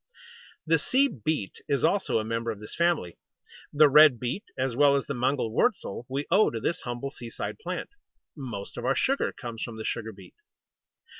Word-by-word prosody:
The 165 0 +3
Sea 265 - +3
Beet 125 - -3
is 140 - 0
also 190 - +2
a 110 - 0
member 115 +1 -2
of 110 -3 -4
this 105 - -9
family. 170 - 0 0.5
The 150 +1 +6
Red 145 -3 +7
Beet, 125 - -3
as 130 -2 -1
well 140 +1 +5
as 140 - 0
the 140 - -3
Mangel 125 -2 0
wurzel, 115 +2 0
we 140 +2 -2
owe 205 +4 +5
to 115 - -4
this 165 - -2
humble 120 +3 -5
seaside 120 - -6
plant. 440 - -5 0.4
Most 120 -9 -7
of - - -6
our - - +1
sugar 275 +1 +1
comes 115 -3 -8
from 115 -2 -5
the 110 - -6
Sugar 115 -1 -3
beet. 95 -3 -15
130 Hz, 190 wpm, -27 LUFS, 115-150 Hz, 0.5 s, Red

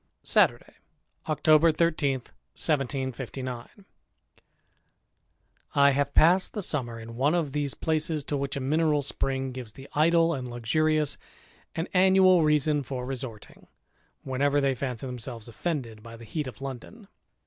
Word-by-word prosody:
Saturday, - - +2 0.5
October 155 +1 +4
13, 155 -3 +1
1759. 130 -2 -4 2.1
T - - +1
HAVE 140 0 +3
passed 180 +4 +5
the 210 - -3
summer 120 -8 -2
in 115 +1 -9
one 140 +7 +2
of 160 -5 -1
these 145 -1 -2
places 155 -1 -1
to 150 - -5
^ - - -1
which 140 0 -3
a - - -2
mineral 150 +2 +1
spring 135 -1 -2
gives 125 -4 -8
the 135 0 -12
idle 165 +2 +3
and 130 -4 -5
luxurious 150 +6 0 0.6
an 165 - -2
annual 185 -1 +5
reason 150 -1 +2
for 130 -1 -5
resorting, 125 -5 -7 0.6
whenever 140 +2 +1
they 140 -1 +2
fancy 125 -1 -4
themselves 125 -2 -6
offended 120 -4 -4
by 115 +1 -11
the 115 - -12
heat 150 +5 -4
of 130 - -10
London. 135 - -8
140 Hz, 135 wpm, -27 LUFS, 125-155 Hz, 2.1 s, passed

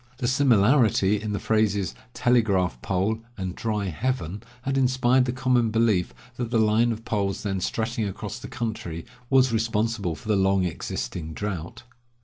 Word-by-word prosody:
The 120 - -1
similarity 115 -5 +3
in 105 -1 -3
the 100 - -1
phrases, 105 -3 +1 0.2
telegraph 100 - +2
pole 100 +4 0 0.2
and 95 -2 -3
dry 105 -2 -2
heaven, 105 -1 -2 0.2
had 135 +1 -1
inspired 130 -1 +3
the 120 - -1
common 125 -2 +2
belief 110 -5 +2 0.3
that 120 -2 -3
the 120 - +1
line 110 +2 +3
of 115 0 -6
poles 100 -2 -1
then 95 -3 -2
stretching 110 +2 -1
across 105 +4 -6
the - - -8
country 110 -10 -4 0.2
was 130 -2 +4
responsible 110 -5 0
for 80 - -13
the 105 - +3
long 95 -1 +3
existing 80 -1 -4
drought. 95 -5 -5
110 Hz, 155 wpm, -25 LUFS, 95-120 Hz, 0.3 s, was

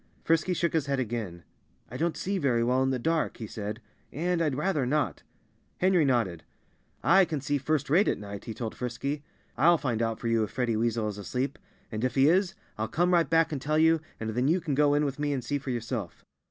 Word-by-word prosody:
Frisky 165 +3 +2
shook 170 0 0
his 155 -3 0
head 140 -1 0
again. 110 -8 -4 0.5
"I - - -7
don't 165 +4 -1
see 195 +1 -1
very 125 -6 +2
well 125 +2 +2
in 130 - +2
the 130 - 0
dark," 160 +6 0
he 115 - -5
said, 105 +1 -5 0.3
"and 175 +3 0
I'd 150 -5 +1
rather 150 -1 0
not." 145 +4 0 0.6
Henry 180 -4 +3
nodded. 115 - 0 0.6
"I 190 +5 +6
can 155 -4 -2
see 140 +1 -1
first 150 +1 0
rate 175 +9 +4
at - - +1
night," 100 -1 -8
he 110 - -6
told 115 -1 -4
Frisky. 140 +4 -4 0.4
"I'll 170 +5 +6
find 120 -7 -1
out 115 -1 -1
for 120 - -4
you 115 -1 +2
if 105 - -3
Freddie 120 0 -1
Weasel 115 0 0
is 105 0 -6
asleep. 130 +7 -3 0.3
And 110 +1 -3
if 130 - 0
he 135 +1 +5
is, 190 +3 +3 0.2
I'll 110 - 0
come 175 +7 +1
right 170 -4 +3
back 165 0 +3
and 145 -4 -3
tell 150 +2 0
you, 160 0 +4 0.2
and 110 0 -3
then 125 +4 0
you 170 +5 +3
can 160 -4 -3
go 145 +1 +3
in 150 0 +2
with 140 0 -3
me 145 -1 0
and 130 -3 -3
see 145 +4 -1
for 135 - -7
yourself." 115 -6 -4
135 Hz, 235 wpm, -28 LUFS, 115-160 Hz, 0.6 s, I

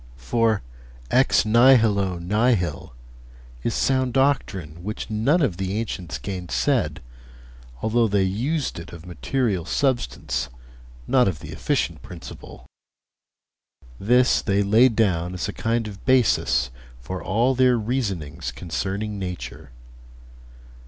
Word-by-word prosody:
For 110 - +1 0.5
"ex 130 -2 +4
nihilo 110 -5 +4
nihil" 90 - 0 0.7
is - - -1
sound 130 -2 +1
doctrine 95 - 0
which 105 +2 -5
none 140 +11 +2
of 100 -11 0
the 95 +1 -2
ancients 90 - -4
gainsaid, 85 -4 -1 0.8
although 115 +1 +2
they 100 -2 +2
used 125 - -1
it 85 +1 -10
of 85 0 -10
material 95 - -1
substance, 130 - -1 0.6
not 125 -4 +3
of 90 -6 -1
the - - -10
efficient - - -1
principle; 85 -2 -11 1.3
this 125 +5 +3
they 100 0 +1
laid 115 +4 +4
down 90 -5 +1
as 90 - -3
a - - -5
kind 115 0 -1
of 100 -2 -10
basis 105 - +2 0.3
for 90 +10 -6
all 115 +7 +2
their 130 -1 +4
reasonings 100 - -3
concerning 100 +4 -4
nature. 90 -10 -6
105 Hz, 115 wpm, -23 LUFS, 90-120 Hz, 1.3 s, ex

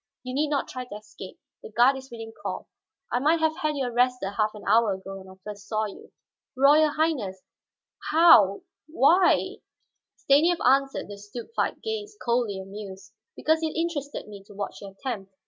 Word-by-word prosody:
You 255 0 -6
need 295 +3 0
not 285 -2 0
try 255 -1 -6
to 225 - -9
escape; 210 -3 -11 0.2
the - - -10
guard 240 +5 +4
is 265 0 -9
within 225 -2 -8
call. - - -5 0.4
I 245 - +1
might 310 +5 +3
have 315 0 +1
had 305 -1 -1
you 275 -2 -1
arrested 245 -3 +1
half 215 +1 0
an 210 - -10
hour 220 0 +4
ago 195 +1 -8
when 190 0 -13
I 190 - -14
first 210 -1 -9
saw 215 -1 0
you." 205 - -10 0.5
"Royal 295 +3 +6
Highness, 255 - -1 0.7
how 300 - +6 0.2
why 335 +4 +3 0.3
" - - -57
Stanief 320 +6 +4
answered 270 +2 +2
the 200 0 -9
stupefied 230 - -4
gaze, 425 -2 -5
coldly 235 -5 0
amused. 195 0 -9 0.2
"Because 315 +1 +1
it 315 -1 -2
interested 295 -7 -3
me 200 -2 -11
to 205 -1 -15
watch 200 0 -5
your 200 -1 -9
attempt. 195 -4 -6
245 Hz, 180 wpm, -26 LUFS, 205-300 Hz, 0.7 s, Royal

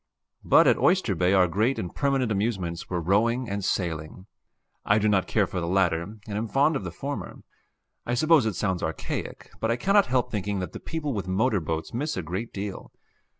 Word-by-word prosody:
But - - +6
at - - +4
Oyster 180 - +3
Bay 90 +1 +1
our 95 -2 +5
great 110 +10 +1
and 90 - -4
permanent 135 -5 0
amusements 95 -5 -2
were 90 - -1
rowing 115 +8 +1
and 100 -1 -3
sailing; 85 -1 -3 0.6
I 100 - +3
do 110 0 +2
not 100 -3 +2
care 105 -3 +2
for 95 - -4
the 85 - -3
latter, 85 -2 +2
and 105 +5 -9
am 105 +2 -3
fond 145 +7 +2
of 135 - -2
the 90 - -4
former. 140 - -6 0.6
I 120 - -1
suppose 155 -2 +4
it 105 - -2
sounds 95 -1 -1
archaic, 80 -2 -5
but 115 - -1
I 115 - +2
cannot 195 +10 +3
help 125 -1 0
thinking 105 -1 -2
that 90 -3 -4
the - - -8
people 150 -4 -4
with 100 -4 -4
motor 100 +3 +1
boats 80 -1 -4
miss 145 +3 -2
a 90 - -2
great 95 +8 -4
deal. 100 -1 -6
100 Hz, 205 wpm, -26 LUFS, 90-120 Hz, 0.6 s, But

